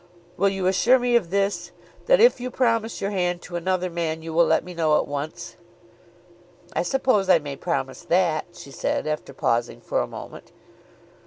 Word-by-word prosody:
Will 200 +2 +2
you 195 -1 -3
assure 195 +7 +4
me 245 -1 +1
of 205 -8 +2
this, 200 +2 -1 0.4
that - - +5
if 470 - +5
you 250 - -3
promise 230 -3 0
your 200 +1 -1
hand 180 -2 -1
to 175 - -8
another 185 +1 0
man, 165 -2 -3
you 165 0 -6
will 170 +1 +4
let - - +2
me 180 - -9
know 160 -3 +2
at - - -1
once?" 145 +2 -6 1.2
"I - - 0
suppose 210 -1 +1
I 185 - +7
may 145 -3 -6
promise 135 -5 -3
that," 170 -3 +2
she 175 -6 -12
said, - - -2
after 155 -2 -3
pausing 120 -3 -1
for - - -1
a - - -3
moment. - - -10
180 Hz, 185 wpm, -24 LUFS, 160-200 Hz, 1.2 s, I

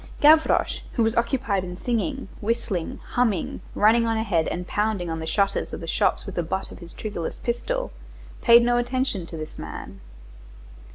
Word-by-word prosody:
Gavroche, 315 +2 +5
who 235 - +2
was 225 0 +1
occupied 235 -5 +1
in 180 -1 -6
singing, 250 +6 -2
whistling, 210 -6 -2
humming, 225 -8 0
running 230 +2 +4
on 225 0 +1
ahead 195 -8 +1
and 180 +1 -3
pounding 205 -4 -1
on 160 - -3
the 160 - -5
shutters 195 +4 0
of - - -4
the - - -6
shops - - +1
with - - -6
the 175 - 0
butt 190 +4 -3
of - - -10
his 170 -1 -10
triggerless 190 -7 -5
pistol; - - -2 0.5
paid 235 0 +7
no 240 0 +3
attention 245 -7 -1
to 165 - -7
this 155 0 -7
man. - - -8
220 Hz, 175 wpm, -25 LUFS, 180-240 Hz, 0.5 s, paid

